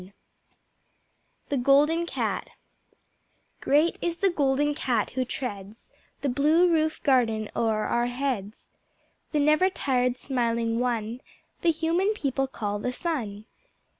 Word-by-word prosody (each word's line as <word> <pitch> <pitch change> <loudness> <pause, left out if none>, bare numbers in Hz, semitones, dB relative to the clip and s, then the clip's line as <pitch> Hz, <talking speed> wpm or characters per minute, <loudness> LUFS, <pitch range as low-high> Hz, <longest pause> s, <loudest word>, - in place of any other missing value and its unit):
The 285 - 0
Golden 295 +6 +3
Cat - - -2 1.1
Great 300 +4 +2
is 340 -1 -2
the 390 0 +2
Golden 290 -1 +1
Cat 240 -7 -1
who 260 +1 -1
treads 215 -5 -6 0.4
The 285 - -1
Blue 305 +7 +4
Roof 315 -2 +1
Garden 225 -6 +2
o'er 220 -2 +1
our 240 0 0
heads, 245 -5 -3 0.6
The 305 - 0
never 305 +5 +4
tired 250 -7 0
smiling 235 -3 -1
One 240 -1 -2 0.4
That 345 - +3
Human 340 +6 +1
People 270 - -1
call 205 -5 -4
the 250 - -2
Sun. 235 - -3
265 Hz, 120 wpm, -26 LUFS, 235-305 Hz, 1.1 s, Blue